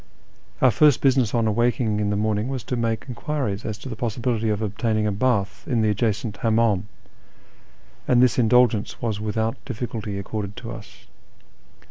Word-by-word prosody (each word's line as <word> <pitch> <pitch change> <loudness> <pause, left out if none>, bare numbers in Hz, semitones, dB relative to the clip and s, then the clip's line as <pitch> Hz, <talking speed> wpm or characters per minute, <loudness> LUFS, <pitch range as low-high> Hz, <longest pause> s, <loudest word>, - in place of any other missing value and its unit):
Our 130 - +7
first 150 +1 +4
business 130 -5 +3
on 115 -1 +2
awaking 110 -1 +1
in 105 -1 0
the 100 - 0
morning 105 +1 0
was 130 -3 -4
to 125 - -3
make 115 -2 -1
enquiries 125 -5 -3
as 105 -2 -3
to 110 - -9
the 120 - -5
possibility 115 -1 -1
of 105 -1 0
obtaining 110 +1 -1
a 105 - +1
bath 100 -5 0
in 115 -3 +1
the 105 - +3
adjacent 105 0 -1
licmimdm, 110 -4 +2 1.2
and 125 - +4
this 125 0 +4
indulgence 120 -2 +3
was 110 -3 -2
without 110 +1 -2
difficulty 110 -5 -4
accorded 100 0 -5
to - - -7
us. - - -11
110 Hz, 165 wpm, -23 LUFS, 105-120 Hz, 1.2 s, Our